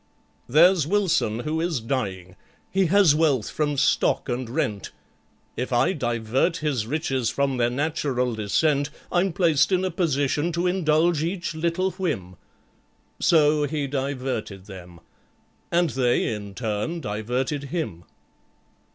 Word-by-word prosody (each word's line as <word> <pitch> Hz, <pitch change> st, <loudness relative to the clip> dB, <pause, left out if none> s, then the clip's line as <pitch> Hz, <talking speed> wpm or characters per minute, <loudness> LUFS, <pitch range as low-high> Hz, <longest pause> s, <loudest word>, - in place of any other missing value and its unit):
"There's 165 Hz, +3 st, +5 dB
WILSON 170 Hz, -, +1 dB
who 155 Hz, +4 st, -2 dB
is 170 Hz, -5 st, -1 dB
dying—he 110 Hz, -, -3 dB
has 190 Hz, -3 st, +5 dB
wealth 150 Hz, -8 st, +1 dB
from 145 Hz, -2 st, -1 dB
Stock 135 Hz, -, +2 dB
and 120 Hz, -1 st, -3 dB
rent— 110 Hz, -7 st, -2 dB, 0.7 s
If 125 Hz, +2 st, -3 dB
I 120 Hz, +9 st, +3 dB
divert 120 Hz, -, 0 dB
his 135 Hz, -8 st, -1 dB
riches 135 Hz, -4 st, -1 dB
from 140 Hz, -2 st, 0 dB
their 120 Hz, -1 st, +2 dB
natural 130 Hz, -2 st, -1 dB
descent, 140 Hz, +7 st, +1 dB, 0.2 s
I'm 180 Hz, +2 st, +2 dB
placed 165 Hz, -3 st, +2 dB
in 185 Hz, 0 st, +2 dB
a 185 Hz, -, -1 dB
position 150 Hz, -1 st, 0 dB
to 170 Hz, +2 st, -1 dB
indulge 170 Hz, -3 st, +2 dB
each 170 Hz, +1 st, -3 dB
little 170 Hz, +4 st, -1 dB
whim." 100 Hz, -, -3 dB, 0.8 s
So 150 Hz, -2 st, +4 dB
he 150 Hz, 0 st, -2 dB
diverted 130 Hz, -8 st, -3 dB
them—and 95 Hz, -, -6 dB
they, 120 Hz, -2 st, +1 dB
in 100 Hz, -2 st, -7 dB
turn, 115 Hz, -, -2 dB
diverted 125 Hz, +5 st, -2 dB
him. 140 Hz, -, -4 dB
145 Hz, 125 wpm, -24 LUFS, 120-165 Hz, 0.8 s, There's